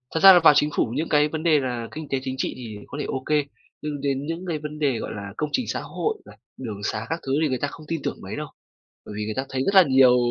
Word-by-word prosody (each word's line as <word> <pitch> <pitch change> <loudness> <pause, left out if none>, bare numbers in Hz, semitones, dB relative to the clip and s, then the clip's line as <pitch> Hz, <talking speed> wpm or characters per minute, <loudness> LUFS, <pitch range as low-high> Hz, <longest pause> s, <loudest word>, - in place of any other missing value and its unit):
Thật - - +2
ra 195 +1 +10
là 180 - +7
vào 160 -3 +7
Chính 150 +1 +3
phủ - - +3
những 160 +3 -1
cái 150 0 +4
vấn 155 +1 -5
đề 155 -3 +4
là 120 -3 -3
kinh 155 -2 -7
tế 135 - 0
chính 130 0 -3
trị - - -1
thì 110 -4 -7
có 145 - -8
thể - - -3
ô 130 0 -3
kê, 150 -2 +2 0.4
nhưng 150 -2 -4
đến 140 0 -1
những 165 +4 -4
cái 160 -3 -2
vấn 150 0 -7
đề, 135 -6 +1
gọi - - -5
là, 100 -1 -7
công 150 - -1
trình 255 - +1
xã - - -2
hội 440 0 -2
này, - - -15 0.2
đường 110 -6 -6
sá 110 +1 -2
các 165 +1 -2
thứ 135 - 0
thì 155 - +3
người 130 -2 -1
ta 145 - +1
không 155 - -12
tin 165 -3 -2
tưởng - - -2
mấy - - -6
đâu. - - -4 0.6
Bởi 105 - -8
vì 105 - -2
người 110 0 -3
ta 135 +1 -2
thấy 130 -1 -2
rất 195 - +1
là 190 - +10
nhiều 130 -4 +5
145 Hz, 310 wpm, -24 LUFS, 130-155 Hz, 0.6 s, ra